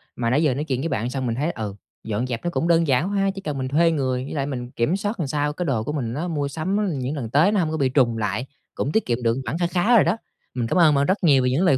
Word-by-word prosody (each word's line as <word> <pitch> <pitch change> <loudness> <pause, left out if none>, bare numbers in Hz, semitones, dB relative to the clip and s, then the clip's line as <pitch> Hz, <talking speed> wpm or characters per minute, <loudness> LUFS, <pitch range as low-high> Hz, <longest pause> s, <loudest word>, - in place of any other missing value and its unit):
Mà 115 -1 -1
nãy 140 +6 +2
giờ 145 -5 +3
nói 140 +4 -2
chuyện 130 -4 -2
với 165 - -1
bạn 120 -2 -1
xong 130 -1 -3
mình 115 -2 -1
thấy, 150 +6 -1
ừ, 105 -7 -5 0.3
dọn 110 +3 -2
dẹp 120 -2 -4
nó 175 - 0
cũng 170 - -1
đơn 165 -2 +3
giản 140 +8 +2
quá 205 - -2
ha, 195 0 +2
chỉ 195 - -6
cần 150 -6 -4
mình 130 -1 -2
thuê 165 +5 +3
người, 130 -4 -1
với 140 - -7
lại 140 -3 -1
mình 125 -3 -5
kiểm 135 +7 0
soát 205 +1 -3
làm 160 - -1
sao 145 +1 -1
cái 180 +4 -3
đồ 125 -8 0
của 150 - -3
mình 125 -7 -3
á 155 +7 -3
mua 145 -4 -1
sắm 180 +1 -1
những 130 +4 -3
lần 125 -6 -4
tới 155 - +4
nó 210 - +2
hổng 160 -3 0
có 160 - -2
bị 135 -3 +2
trùng 125 -4 +2
lại, 105 +3 -2 0.3
cũng 140 - -2
tiết 220 - +1
kiệm 120 0 -1
được 115 +2 +2
khoản 160 - -2
kha 175 0 +1
khá 185 +7 +2
rồi 220 - +7
đó. 175 +6 +1 0.4
Mình 120 -2 -2
cảm 115 - 0
ơn 160 -4 +6
bạn 140 0 +3
rất 190 +3 0
nhiều 140 -5 +5
về 125 - +2
những 150 +9 +1
lời 140 -7 +4
145 Hz, 330 wpm, -23 LUFS, 125-170 Hz, 0.4 s, rồi